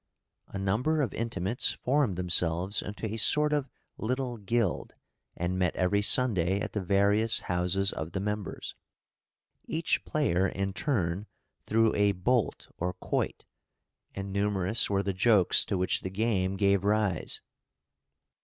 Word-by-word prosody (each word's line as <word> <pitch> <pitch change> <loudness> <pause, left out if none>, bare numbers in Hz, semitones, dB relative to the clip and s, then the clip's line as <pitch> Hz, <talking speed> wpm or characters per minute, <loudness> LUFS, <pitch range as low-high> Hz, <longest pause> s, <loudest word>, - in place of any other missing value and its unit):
A - - -7
number 125 +11 +1
of 130 - -3
intimates 115 0 -1
formed 130 -6 0
themselves 90 +2 +1
into 105 +2 -6
a 110 +1 -3
sort 150 +7 +3
of 145 -3 -1 0.3
little 125 +1 -2
guild, 105 -2 -1 0.4
and 90 +2 -2
met 90 -3 +1
every 95 +3 +1
Sunday 100 -5 +3
at - - -4
the 105 - -1
various 100 +4 +2
houses 90 +2 0
of 80 +1 -6
the 95 - -2
members. 105 0 -4 0.9
Each 160 +1 0
player 95 - +1
in 95 +1 -3
turn 100 - -1 0.4
threw 115 0 +3
a 100 -1 +2
bolt 110 +5 0
or 90 +1 -1
quoit, - - -3 0.7
and 95 0 -5
numerous 100 +1 +1
were 100 -1 +1
the 100 0 -1
jokes 100 -1 +4
to 95 - -2
which 90 0 0
the 95 - -4
game 95 -2 0
gave 100 -1 +2
rise. 105 -4 0
100 Hz, 140 wpm, -29 LUFS, 95-115 Hz, 0.9 s, jokes